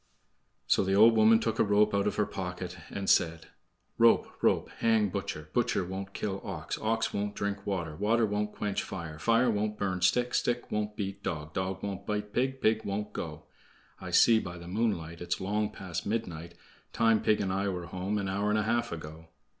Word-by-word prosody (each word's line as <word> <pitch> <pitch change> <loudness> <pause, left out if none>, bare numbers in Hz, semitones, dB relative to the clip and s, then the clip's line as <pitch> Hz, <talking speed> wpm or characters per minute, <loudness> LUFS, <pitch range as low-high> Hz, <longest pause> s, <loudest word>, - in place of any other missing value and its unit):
So - - +3
the 95 0 +1
old 115 +3 +7
woman 110 +1 +6
took 115 -1 -2
a - - +6
rope 105 0 +3
out 100 0 +2
of - - -1
her 105 - +2
pocket, 90 -2 -5
and 100 -1 -5
said: 80 -1 +2 0.5
"Rope, - - +6 0.2
rope, - - +2
hang 110 -3 +3
butcher; 75 -3 -5
Butcher 120 -6 +1
won't 95 +1 -6
kill 100 -2 -3
ox; 85 -6 -5
Ox 115 +1 0
won't 100 0 -2
drink 100 0 -3
water; 85 -6 -2
Water 110 +5 +2
won't 105 0 -1
quench 105 -2 -2
fire; 85 -5 -7
Fire 115 +5 +3
won't 105 0 -1
burn 95 -3 -2
stick; 120 +8 +2
Stick 120 0 0
won't 105 0 -2
beat 100 -1 -4
dog; 75 -1 -4
Dog 95 0 -3
won't 100 -1 -5
bite 105 -1 -3
pig; 130 +1 0
Pig 110 0 +2
won't 100 +1 -3
go. - - -6 0.6
I - - -7
see 115 -2 +6
by 90 -4 -6
the 85 0 -10
moonlight 90 -5 -2
It's 90 0 -2
long 105 +2 0
past 90 -5 -6
midnight; 85 -7 -3 0.4
Time 115 -1 +3
pig 105 - +2
and 95 -2 -1
I 100 +1 0
were 90 -2 -4
home 95 +4 -3
an 100 -2 -2
hour 100 +2 0
and 105 - +2
a 105 - +1
half 120 +2 0
ago." 80 0 -8
100 Hz, 200 wpm, -30 LUFS, 90-110 Hz, 0.6 s, old